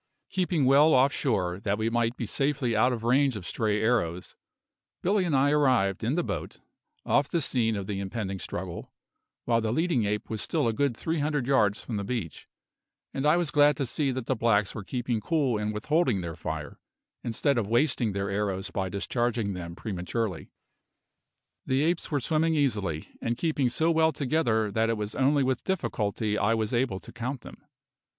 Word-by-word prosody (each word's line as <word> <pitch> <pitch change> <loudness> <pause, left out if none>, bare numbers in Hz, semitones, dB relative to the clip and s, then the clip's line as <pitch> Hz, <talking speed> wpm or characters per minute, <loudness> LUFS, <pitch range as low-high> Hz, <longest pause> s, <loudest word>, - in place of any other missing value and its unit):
Keeping 175 -6 +1
well 145 +4 +6
off 135 +2 +4
shore, 95 -9 0
that 100 0 -1
we 110 0 -1
might 115 +1 0
be 115 - -3
safely 135 0 0
out 125 +4 +4
of 115 -2 -3
range 130 +2 +3
of 100 -5 -6
stray 105 +1 0
arrows, 90 -7 0 0.7
Billy 195 +1 +2
and 160 -5 +1
I 140 +2 +3
arrived, 130 -11 +2
in 120 +6 0
the 175 - +1
boat, - - -5 0.5
off 145 -1 +2
the 170 - +1
scene 120 -6 +1
of 100 -2 -4
the 100 -1 -3
impending 100 -1 -4
struggle, 90 -1 -6 0.5
while 115 -1 +2
the 110 -1 -1
leading 160 -4 +1
ape 105 +1 -2
was 110 -2 -3
still - - 0
a 115 - +1
good 135 -1 0
three 160 0 -2
hundred 145 -3 0
yards 110 -6 +2
from 115 - -4
the 100 - -2
beach, 100 -7 -5 0.7
and 135 +2 0
I 155 +3 +5
was 175 -4 -1
glad 145 -2 +4
to 140 - -1
see 140 +3 -1
that 130 -2 -3
the 130 - 0
blacks 105 -3 +2
were 110 - -6
keeping 120 0 -2
cool 135 -5 +1
and 105 0 -1
withholding 125 - +1
their 85 -2 -5
fire, - - -6 0.4
instead 120 +3 +1
of 105 - -2
wasting 120 -2 +1
their 100 0 -2
arrows 100 -1 -2
by 95 -2 -2
discharging 115 +1 -1
them 85 -2 -6
prematurely. 95 -2 -3 1.2
The 130 +2 +2
apes 170 +2 0
were 145 - 0
swimming 160 +4 +1
easily, 105 - -1
and 115 0 -1
keeping 145 -4 +1
so 160 +7 +1
well 160 0 +3
together 125 -8 0
that 110 +2 +1
it 115 - 0
was 105 0 -4
only 140 +1 +2
with 130 -1 -1
difficulty 105 - -1
I 115 +3 +2
was 110 +1 -2
able 120 -6 0
to - - -12
count 125 +2 -4
them. - - -12
120 Hz, 190 wpm, -27 LUFS, 105-140 Hz, 1.2 s, well